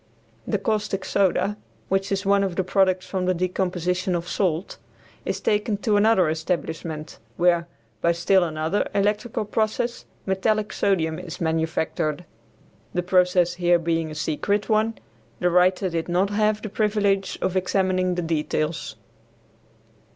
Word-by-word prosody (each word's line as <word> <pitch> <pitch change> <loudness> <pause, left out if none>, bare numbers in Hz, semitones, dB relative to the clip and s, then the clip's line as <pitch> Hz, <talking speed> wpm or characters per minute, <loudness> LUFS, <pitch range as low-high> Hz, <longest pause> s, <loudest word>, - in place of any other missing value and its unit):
The - - +1
caustic 205 -2 -1
soda, 200 +1 +1 0.3
which 195 +1 0
is 195 0 -1
one 200 0 +4
of 190 -3 -2
the 190 - +1
products 185 0 +2
from 185 -2 -2
the 185 - +2
decomposition 180 0 -1
of 170 0 -3
salt, 175 -1 -1 0.5
is 195 - -2
taken 210 +1 0
to 210 +1 +1
another 205 -4 +4
establishment, 160 -2 -3 0.2
where, 170 -1 +3 0.3
by 170 - +3
still 175 +3 +3
another 160 +3 -1
electrical 210 +2 0
process, 220 +3 -1 0.2
metallic 210 +2 0
sodium 165 -5 +1
is 180 -3 -8
manufactured. 160 0 -1 0.7
The 180 - +1
process 180 -1 +3
here 175 0 +5
being 165 -1 -1
a 155 - -7
secret 200 +8 -1
one, 220 +1 +2 0.4
the 180 - +2
writer 185 +2 +3
did 170 -1 -3
not 185 +3 +1
have 215 0 +1
the 215 - -4
privilege 200 -2 +1
of 185 - -1
examining 185 -1 +1
the 175 - -2
details. 155 -2 -2
185 Hz, 140 wpm, -24 LUFS, 170-200 Hz, 0.7 s, here